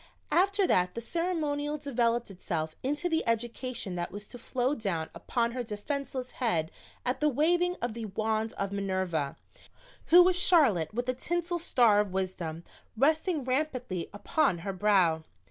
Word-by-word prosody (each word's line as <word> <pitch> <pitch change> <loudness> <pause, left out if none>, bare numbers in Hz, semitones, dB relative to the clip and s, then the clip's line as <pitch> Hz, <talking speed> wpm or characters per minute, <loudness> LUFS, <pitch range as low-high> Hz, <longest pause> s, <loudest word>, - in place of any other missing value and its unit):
After 395 +2 +3
that 180 - +2
the - - -2
ceremonial 300 0 -1
developed 240 -6 0
itself 160 -4 -3
into 295 +6 -1
the 325 -2 +1
education 230 -2 -2
that 175 0 -3
was 205 +2 -6
to 245 - -10
flow 255 +3 0
down 190 - -2
upon 235 +7 -1
her 250 +1 -3
defenseless 255 +4 -4
head 170 -11 0 0.3
at 250 +1 0
the 300 - +3
waving 345 +6 +2
of 240 -2 -1
the 230 0 -5
wand 220 +2 -1
of 200 0 -3
Minerva, 185 -7 -1 0.7
who 355 +2 +9
was 365 0 +3
Charlotte 275 - +4
with 245 +3 -3
a 255 - +1
tinsel 345 +6 -2
star 240 -10 +4
of 205 -3 0
wisdom 175 -4 -3 0.3
resting 310 - +2
rampantly 255 - -2
upon 205 - +1
her 195 - -2
brow. 185 -5 +3
240 Hz, 155 wpm, -29 LUFS, 195-295 Hz, 0.7 s, who